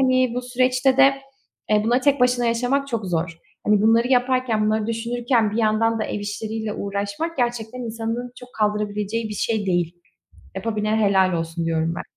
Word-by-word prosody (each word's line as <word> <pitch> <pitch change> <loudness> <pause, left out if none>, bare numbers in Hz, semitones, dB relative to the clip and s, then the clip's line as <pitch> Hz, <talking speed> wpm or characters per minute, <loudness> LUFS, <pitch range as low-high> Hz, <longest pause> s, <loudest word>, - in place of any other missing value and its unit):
hani 255 -2 +2
bu 250 - -2
süreçte 255 +1 +1
de 275 0 +6 0.6
e, 210 0 +3
bunları 240 +3 +2
tek 280 0 +2
başına 245 -1 +3
yaşamak 250 +4 0
çok 225 -6 -3
zor. 165 -1 -2 0.3
Hani 210 -1 +4
bunları 230 +2 +4
yaparken, 250 -3 +2
bunları 215 0 0
düşünürken, 235 0 0
bir 210 - -4
yandan 225 0 +2
da - - 0
ev 210 - -4
işleriyle 215 +1 -4
uğraşmak... 200 +13 -3
Gerçekten 240 -1 -2
insanın 230 +1 -4
çok 250 - -12
kaldırabileceği 210 +1 -1
bir 210 - -5
şey 215 -1 -1
değil. 175 -2 0 0.6
Yapabilene 215 +1 -1
helal 190 -2 +3
olsun 165 0 -3
diyorum 165 0 0
ben. - - -5
225 Hz, 170 wpm, -22 LUFS, 205-245 Hz, 0.6 s, de